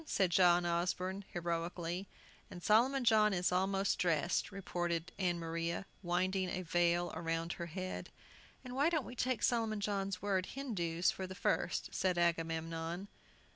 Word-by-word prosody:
said 190 Hz, -9 st, +2 dB
John 175 Hz, -1 st, +5 dB
Osborne, 180 Hz, +3 st, -1 dB
heroically. 170 Hz, +1 st, -3 dB, 0.4 s
"And 175 Hz, -1 st, -9 dB
Solomon 250 Hz, +5 st, +4 dB
John 215 Hz, -3 st, +5 dB
is 180 Hz, 0 st, +1 dB
almost 195 Hz, +2 st, +1 dB
dressed," 170 Hz, +1 st, +1 dB
reported 175 Hz, -3 st, -2 dB
Ann 175 Hz, -2 st, +1 dB
Maria, 170 Hz, +2 st, -2 dB, 0.2 s
winding 185 Hz, +1 st, 0 dB
a 185 Hz, +1 st, -3 dB
veil 175 Hz, 0 st, +2 dB
around 165 Hz, +1 st, -2 dB
her 170 Hz, -, -5 dB
head. 185 Hz, +3 st, -5 dB, 0.5 s
"Why 265 Hz, +5 st, +1 dB
don't 315 Hz, -6 st, 0 dB
we 250 Hz, -, -8 dB
take 250 Hz, -3 st, 0 dB
Solomon 225 Hz, -3 st, +1 dB
John's 195 Hz, -2 st, -1 dB
word 190 Hz, -2 st, 0 dB
'Hindoos' 180 Hz, -11 st, 0 dB
for 190 Hz, -, -5 dB
the 185 Hz, -, -8 dB
first?" -, -, 0 dB
said 185 Hz, -2 st, +1 dB
Agamemnon. 165 Hz, +2 st, -1 dB
180 Hz, 140 wpm, -35 LUFS, 170-200 Hz, 0.5 s, John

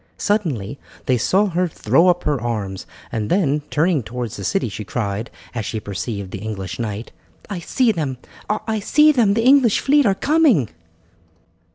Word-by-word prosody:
Suddenly 145 Hz, -, -1 dB, 0.3 s
they 125 Hz, -2 st, +2 dB
saw 195 Hz, -, +3 dB
her 180 Hz, -2 st, 0 dB
throw 170 Hz, +1 st, +2 dB
up 180 Hz, 0 st, +2 dB
her 145 Hz, -5 st, 0 dB
arms, 105 Hz, -5 st, -4 dB, 0.2 s
and 110 Hz, -2 st, -2 dB
then, 150 Hz, -6 st, +2 dB
turning 160 Hz, -1 st, +2 dB
towards 120 Hz, 0 st, -5 dB
the 100 Hz, -, -7 dB
city, 195 Hz, -, 0 dB
she 105 Hz, 0 st, -6 dB
cried, 100 Hz, +1 st, -3 dB, 0.2 s
as 115 Hz, -3 st, -3 dB
she 110 Hz, +2 st, -3 dB
perceived 100 Hz, -1 st, -5 dB
the 95 Hz, -, -5 dB
English 95 Hz, -3 st, -5 dB
knight: 110 Hz, -1 st, -4 dB, 0.4 s
"I 190 Hz, -, -3 dB
see 235 Hz, +7 st, +1 dB
them! 150 Hz, -9 st, -3 dB, 0.3 s
I 215 Hz, +1 st, -1 dB
see 300 Hz, +9 st, +5 dB
them! 225 Hz, -8 st, +3 dB
The 225 Hz, -, +1 dB
English 260 Hz, -5 st, +5 dB
fleet 285 Hz, -2 st, +3 dB
are 195 Hz, -, +3 dB
coming!" 275 Hz, -, +3 dB
145 Hz, 170 wpm, -20 LUFS, -, 0.4 s, see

